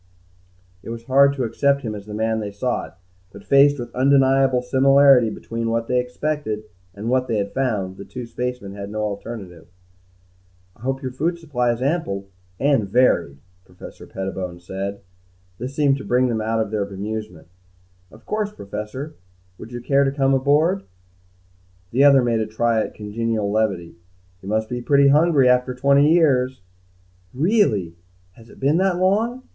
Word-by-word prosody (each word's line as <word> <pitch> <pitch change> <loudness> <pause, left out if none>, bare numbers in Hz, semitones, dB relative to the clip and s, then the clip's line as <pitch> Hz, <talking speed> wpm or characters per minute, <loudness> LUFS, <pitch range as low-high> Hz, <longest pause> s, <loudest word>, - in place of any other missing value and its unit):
It - - -10
was 115 0 -6
hard 140 +3 +4
to 135 -2 -3
accept 140 +4 +1
him 110 -3 -3
as 105 -1 -9
the 105 - -6
man 110 +1 0
they 105 -1 -4
sought, 105 -3 -4 0.3
but, 100 - -13
faced 140 +1 +5
with 120 -2 -7
undeniable 135 -1 +3
similarity 135 -1 +5
between 115 +1 -4
what 115 0 -1
they 125 0 +2
expected 125 -3 -3 0.3
and 105 +3 -6
what 130 +1 +1
they 110 - -1
had 100 -1 -3
found, 105 -8 -2
the - - -8
two 125 +4 -8
spacemen 125 -3 -5
had 100 0 -7
no 110 +1 -4
alternative. 100 -5 -6 1.1
"I - - -24
hope 135 +2 -3
your 130 - -3
food 165 +7 -1
supply 130 -8 -1
is 120 +2 -3
ample 100 - -2 0.3
and 135 -8 +1
varied," 95 - +2 0.3
Professor 90 -1 -13
Pettibone 95 -2 -5
said. 95 +3 -6 0.6
This 130 +4 -6
seemed 140 -2 +2
to 135 - -8
bring 125 +1 +2
them 110 -2 -1
out 110 +1 -1
of 110 -2 -2
their 105 -2 0
bemusement. 100 -3 -6 0.6
"Of 110 +1 -17
course, 210 -1 -2
Professor. 105 - -7 0.5
Would 110 - -10
you 120 0 -6
care 140 +3 +2
to 135 - +1
come 135 -1 +1
aboard?" 150 +8 +2 1.1
The 130 +4 +3
other 140 -2 +6
made 115 -2 +1
a 110 - -1
try 110 +1 +1
at - - -5
congenial 110 0 -2
levity. 95 -6 -1 0.4
"You 95 - -8
must 110 +1 0
be 125 +1 -4
pretty 140 +2 +4
hungry 150 -2 +4
after 125 0 +2
twenty 140 +3 +4
years." 130 - +2 0.7
"Really 125 - +1 0.3
has 115 +5 -18
it - - -16
been 140 +4 +2
that 190 -1 +1
long? 220 +7 +1
125 Hz, 170 wpm, -21 LUFS, 105-140 Hz, 1.1 s, other